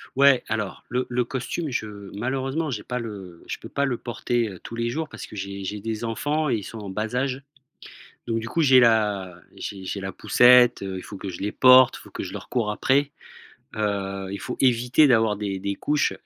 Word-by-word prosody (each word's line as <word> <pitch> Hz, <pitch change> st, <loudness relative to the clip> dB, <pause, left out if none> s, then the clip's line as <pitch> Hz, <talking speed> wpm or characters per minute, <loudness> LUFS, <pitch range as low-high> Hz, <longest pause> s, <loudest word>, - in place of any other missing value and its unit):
Ouais 140 Hz, -1 st, +5 dB
alors 105 Hz, -4 st, -3 dB
le 125 Hz, +1 st, -1 dB
le 125 Hz, 0 st, 0 dB
costume 135 Hz, +6 st, -3 dB
je 110 Hz, -, -2 dB, 0.3 s
malheureusement 135 Hz, +6 st, -2 dB
j'ai 105 Hz, -3 st, -4 dB
pas 125 Hz, 0 st, -3 dB
le 95 Hz, -7 st, -8 dB
je -, -, -4 dB
peux -, -, -9 dB
pas 140 Hz, -, -1 dB
le 130 Hz, -4 st, 0 dB
porter, 120 Hz, 0 st, -1 dB
heu, 95 Hz, -, -10 dB
tous -, -, -9 dB
les 115 Hz, 0 st, -1 dB
jours 155 Hz, +4 st, -3 dB
parce -, -, -9 dB
que -, -, -12 dB
j'ai 100 Hz, 0 st, -5 dB
j'ai 105 Hz, +1 st, -4 dB
des 110 Hz, +1 st, -3 dB
enfants 145 Hz, +6 st, -1 dB
et -, -, +2 dB
ils 105 Hz, -, -4 dB
sont 115 Hz, -, -8 dB
en 100 Hz, -2 st, -7 dB
bas 110 Hz, +4 st, -3 dB
âge. 135 Hz, 0 st, -1 dB, 0.9 s
Donc 115 Hz, -1 st, -1 dB
du 115 Hz, -, -6 dB
coup 165 Hz, -, -1 dB
j'ai 130 Hz, -3 st, +7 dB
la 105 Hz, -6 st, +2 dB, 0.2 s
j'ai 95 Hz, -2 st, -7 dB
j'ai 100 Hz, +2 st, -4 dB
la 95 Hz, 0 st, -4 dB
poussette, 125 Hz, +4 st, +5 dB
heu, 95 Hz, -1 st, -4 dB
il -, -, -8 dB
faut 100 Hz, -, -9 dB
que 95 Hz, 0 st, -7 dB
je 90 Hz, -, -7 dB
les 105 Hz, +1 st, -2 dB
porte, 130 Hz, 0 st, +7 dB
il -, -, -14 dB
faut -, -, -14 dB
que -, -, -5 dB
je -, -, -7 dB
leur -, -, -8 dB
cours 115 Hz, -4 st, 0 dB
après, 140 Hz, +6 st, +1 dB, 0.6 s
heu, 100 Hz, -2 st, -2 dB
Il 100 Hz, -, -5 dB
faut 125 Hz, -, -5 dB
éviter 125 Hz, +3 st, +4 dB
d'avoir 110 Hz, -4 st, +3 dB
des 100 Hz, -2 st, -3 dB
des 100 Hz, +1 st, -3 dB
couches. 150 Hz, +6 st, 0 dB
115 Hz, 230 wpm, -24 LUFS, 100-130 Hz, 0.9 s, j'ai